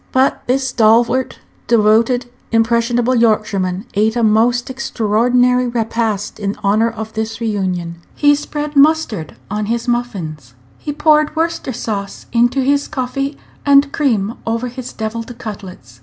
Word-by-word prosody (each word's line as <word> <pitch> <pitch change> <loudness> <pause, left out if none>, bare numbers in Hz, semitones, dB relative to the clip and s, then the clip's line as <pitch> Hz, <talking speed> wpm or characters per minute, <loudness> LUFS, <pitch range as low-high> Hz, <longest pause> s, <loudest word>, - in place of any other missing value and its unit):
But 260 +1 +2
this 265 +1 +1
stalwart, 235 +2 +2 0.3
devoted, 230 +2 +3 0.3
impressionable 235 +2 +2
Yorkshireman 210 -5 +1
ate 215 +3 +1
a 240 - +1
most 235 +4 +2
extraordinary 250 +1 +1
repast 225 -3 -2
in 200 -1 -2
honor 215 +3 +3
of 220 -1 -7
this 220 +1 -3
reunion. 185 -6 -2 0.2
He 290 0 +4
spread 295 0 -4
mustard 280 - +2 0.2
on 210 0 -2
his 230 +2 -2
muffins. 175 - -3 0.2
He 295 - -4
poured 305 +1 +2
Worcester 330 -3 -1
sauce 205 -4 -5
into 240 +3 +3
his 285 +2 +1
coffee, 275 +2 -3 0.3
and 280 0 +4
cream 225 -7 0
over 230 +2 -2
his 250 0 -7
deviled 230 +2 -5
cutlets. 190 - -9
235 Hz, 130 wpm, -17 LUFS, 215-255 Hz, 0.3 s, He